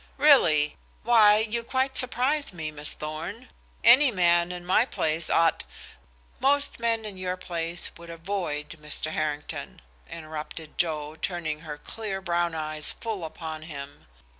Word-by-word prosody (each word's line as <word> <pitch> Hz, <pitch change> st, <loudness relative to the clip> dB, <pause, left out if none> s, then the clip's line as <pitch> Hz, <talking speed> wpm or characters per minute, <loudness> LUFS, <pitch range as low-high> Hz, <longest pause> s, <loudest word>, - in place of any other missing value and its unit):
"Really? 160 Hz, -, +5 dB, 0.3 s
Why, 215 Hz, -3 st, +6 dB
you 220 Hz, +2 st, 0 dB
quite 260 Hz, +2 st, -1 dB
surprise 260 Hz, +4 st, +3 dB
me, 160 Hz, -3 st, -5 dB
Miss 150 Hz, 0 st, -7 dB
Thorn. 165 Hz, +11 st, -6 dB, 0.3 s
Any 260 Hz, +4 st, +7 dB
man 175 Hz, -4 st, +2 dB
in 175 Hz, -1 st, -7 dB
my 185 Hz, +5 st, +4 dB
place 160 Hz, -9 st, -1 dB
ought" 165 Hz, 0 st, +3 dB, 0.8 s
"Most 285 Hz, 0 st, +1 dB
men 230 Hz, -1 st, 0 dB
in 205 Hz, -3 st, -7 dB
your 185 Hz, 0 st, -3 dB
place 170 Hz, -1 st, 0 dB
would 170 Hz, 0 st, -12 dB
avoid 165 Hz, -3 st, -4 dB
Mr. 150 Hz, +1 st, -3 dB
Harrington," 150 Hz, -2 st, -4 dB, 0.3 s
interrupted 155 Hz, 0 st, -8 dB
Joe, 155 Hz, -3 st, -1 dB
turning 160 Hz, -3 st, -3 dB
her 150 Hz, -2 st, -7 dB
clear 205 Hz, +3 st, -5 dB
brown 175 Hz, -2 st, -1 dB
eyes 155 Hz, -1 st, +1 dB
full 220 Hz, -6 st, -5 dB
upon 160 Hz, 0 st, -6 dB
him. 145 Hz, -3 st, -9 dB
170 Hz, 140 wpm, -26 LUFS, 155-220 Hz, 0.8 s, Any